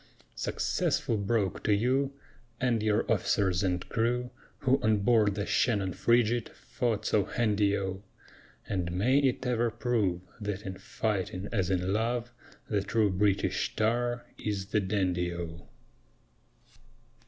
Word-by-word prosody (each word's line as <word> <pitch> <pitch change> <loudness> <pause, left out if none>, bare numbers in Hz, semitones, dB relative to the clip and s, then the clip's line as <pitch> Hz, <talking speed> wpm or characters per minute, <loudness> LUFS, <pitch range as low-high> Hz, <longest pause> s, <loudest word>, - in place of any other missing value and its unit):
Successful 115 - 0
Broke 100 -2 0
to 105 - +3
you, 130 +6 +1 0.5
And 120 -3 +1
your 105 -1 +2
officers 95 -2 +1
and 90 -2 -1
crew, 125 +1 0 0.3
Who 135 +1 +3
on 110 -2 +2
board 105 -2 +3
the 100 -1 -2
Shannon 100 -7 +1
frigate 120 0 +2
Fought 115 -4 -2
so 100 -3 +2
handy 105 -3 +1
O! 95 -1 -3 0.7
And 90 -3 -2
may 125 +10 +3
it 130 -2 +1
ever 120 -1 +1
prove 110 -6 0 0.2
That 105 -1 -4
in 95 -1 -6
fighting 100 -2 -2
as 95 -5 0
in 95 0 0
love 120 +2 -1 0.4
The 105 -2 0
true 105 0 +1
British 100 +1 +1
tar 120 +2 0 0.2
is 100 -2 -2
the 105 - +2
dandy 90 -3 0
O! 85 -1 -7
105 Hz, 130 wpm, -29 LUFS, 95-120 Hz, 0.7 s, to